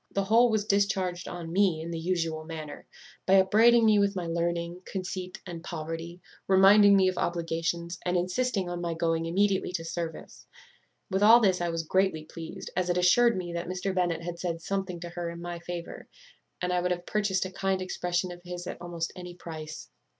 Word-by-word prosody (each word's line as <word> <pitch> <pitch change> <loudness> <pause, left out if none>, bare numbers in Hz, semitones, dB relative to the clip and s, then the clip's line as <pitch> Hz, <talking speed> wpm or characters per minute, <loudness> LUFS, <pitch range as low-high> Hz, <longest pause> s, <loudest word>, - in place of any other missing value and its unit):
The 195 - -1
whole 230 +5 +5
was 215 -2 0
discharged 190 -3 0
on 170 -2 -6
me 190 -4 +3
in 165 +1 -5
the 165 - -3
usual 165 -2 -1
manner, 155 -2 -8 0.4
by 190 - +6
upbraiding 225 +5 +5
me 215 -1 +5
with 200 0 +2
my 180 -2 -3
learning, 170 +1 -2
conceit, 185 -1 -5
and 170 -3 -7
poverty; 165 +1 -6 0.3
reminding 200 +1 +7
me 190 -1 +4
of 185 - -1
obligations, 170 0 -2
and 180 0 +1
insisting 190 +2 0
on 175 0 -4
my 170 -1 -2
going 165 0 0
immediately 195 +2 +1
to 165 -2 -3
service. 165 0 -6 0.6
With 190 +1 0
all 225 +3 +8
this 190 -5 +2
I 175 - 0
was 165 -1 -2
greatly 185 -1 +1
pleased, 165 0 -8
as 180 -1 0
it 175 - +1
assured 225 +6 +4
me 175 -2 -4
that 170 0 -4
Mr. 185 +1 -2
Bennet 175 -3 0
had 170 0 -5
said 170 -2 -2
something 190 0 -3
to 175 - -6
her 175 0 -4
in 170 0 -8
my 175 0 -5
favour; 170 0 -7 0.6
and 180 0 0
I 180 - +1
would 180 - 0
have 175 0 -2
purchased 205 -3 0
a 185 - -6
kind 190 0 -1
expression 180 -1 -2
of 175 0 -10
his 175 0 -6
at - - -7
almost 170 -1 -4
any 180 -1 -8
price. 155 - -8
175 Hz, 200 wpm, -28 LUFS, 170-190 Hz, 0.6 s, all